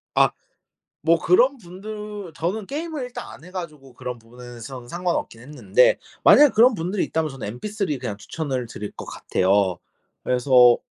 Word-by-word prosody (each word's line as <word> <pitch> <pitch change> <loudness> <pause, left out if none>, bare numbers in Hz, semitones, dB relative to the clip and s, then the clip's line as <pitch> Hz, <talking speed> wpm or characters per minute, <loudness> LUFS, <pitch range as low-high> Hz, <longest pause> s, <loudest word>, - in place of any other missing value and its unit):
아. - - +5 0.7
뭐 165 +2 +4
그런 250 +10 +4
분들 210 0 -8
저는 190 +7 -3
게임을 305 - -4
일단 245 0 -7
안 150 - -12
해 180 - -12
가지고 150 -8 -8
그런 125 0 -6
부분에서는 120 +1 -10
상관없긴 175 -8 -2
했는데 - - +2 0.3
만약 295 -2 +8
그런 235 +2 +6
분들이 180 +3 -1
있다면 160 -1 -1
저는 135 -5 -7
MP3 200 -9 -2
그냥 115 -5 -4
추천을 130 +4 -4
드릴 105 -2 -7
거 - - -8
같아요. 95 -1 +1 0.5
그래서 125 -1 +5
160 Hz, 330 characters per minute, -23 LUFS, 125-210 Hz, 0.7 s, 만약